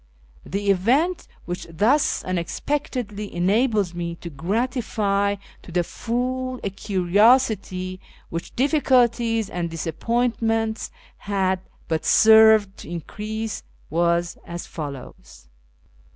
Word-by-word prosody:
The 200 Hz, +1 st, 0 dB
event 265 Hz, -, +1 dB, 0.2 s
wdiich 170 Hz, -2 st, -6 dB
thus 265 Hz, -, +3 dB
unexpectedly 210 Hz, -, -3 dB
enabled 205 Hz, +1 st, +2 dB
me 170 Hz, -1 st, -4 dB
to 170 Hz, 0 st, -9 dB
gratify 200 Hz, -, 0 dB, 0.3 s
to -, -, -12 dB
tlie 175 Hz, 0 st, +1 dB
full 255 Hz, +4 st, -3 dB
a 200 Hz, -, -2 dB
curiosity 195 Hz, -1 st, +2 dB, 0.3 s
which 165 Hz, 0 st, -5 dB
difficulties 240 Hz, -5 st, +2 dB
and 175 Hz, -1 st, -3 dB
disappointments 225 Hz, +6 st, -1 dB, 0.3 s
had 190 Hz, -2 st, 0 dB, 0.3 s
but 160 Hz, -1 st, -1 dB
served 220 Hz, -2 st, +6 dB
to -, -, -10 dB
increase, 215 Hz, +6 st, -5 dB, 0.3 s
was 170 Hz, +1 st, +1 dB
as 170 Hz, 0 st, -6 dB
follows. 140 Hz, -, -9 dB
205 Hz, 95 wpm, -23 LUFS, 175-235 Hz, 0.3 s, served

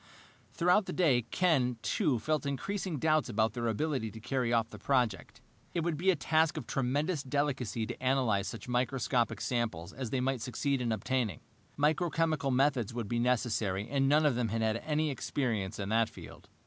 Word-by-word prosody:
Throughout 180 Hz, +4 st, +3 dB
the -, -, -3 dB
day 135 Hz, -10 st, +3 dB
Ken, 130 Hz, -9 st, +2 dB
too, 155 Hz, -, +1 dB
felt 155 Hz, +4 st, -1 dB
increasing 180 Hz, +4 st, -3 dB
doubts 155 Hz, -2 st, +2 dB
about 110 Hz, -1 st, +1 dB
their 120 Hz, -1 st, -2 dB
ability 125 Hz, 0 st, -1 dB
to 110 Hz, -, -10 dB
carry 125 Hz, +1 st, -1 dB
off 115 Hz, -1 st, +1 dB
the -, -, -9 dB
project. 125 Hz, -8 st, 0 dB, 0.3 s
It 170 Hz, -, +1 dB
would 165 Hz, -1 st, -1 dB
be 180 Hz, +6 st, +1 dB
a 190 Hz, -, +5 dB
task 160 Hz, +1 st, +2 dB
of -, -, -4 dB
tremendous 145 Hz, +5 st, 0 dB
delicacy 130 Hz, -5 st, -1 dB
to -, -, -7 dB
analyze 125 Hz, -7 st, +2 dB
such 115 Hz, -, -7 dB
microscopic 125 Hz, -1 st, 0 dB
samples 110 Hz, -7 st, -2 dB
as 130 Hz, -2 st, -5 dB
they 130 Hz, -, -1 dB
might 130 Hz, -1 st, 0 dB
succeed 135 Hz, +2 st, -1 dB
in 120 Hz, -2 st, 0 dB
obtaining. 110 Hz, -, -1 dB, 0.4 s
Microchemical 155 Hz, -1 st, +1 dB
methods 130 Hz, -4 st, +1 dB
would 115 Hz, -4 st, -3 dB
be 120 Hz, -, 0 dB
necessary, 115 Hz, -5 st, 0 dB
and 135 Hz, -1 st, +2 dB
none 150 Hz, +2 st, +4 dB
of 145 Hz, -, +4 dB
them 120 Hz, -1 st, 0 dB
had 115 Hz, +1 st, -1 dB
had 110 Hz, 0 st, +1 dB
any 150 Hz, +3 st, -1 dB
experience 115 Hz, -8 st, -2 dB
in 100 Hz, -1 st, -4 dB
that 115 Hz, +1 st, +2 dB
field. -, -, -12 dB
130 Hz, 185 wpm, -31 LUFS, 115-150 Hz, 0.4 s, a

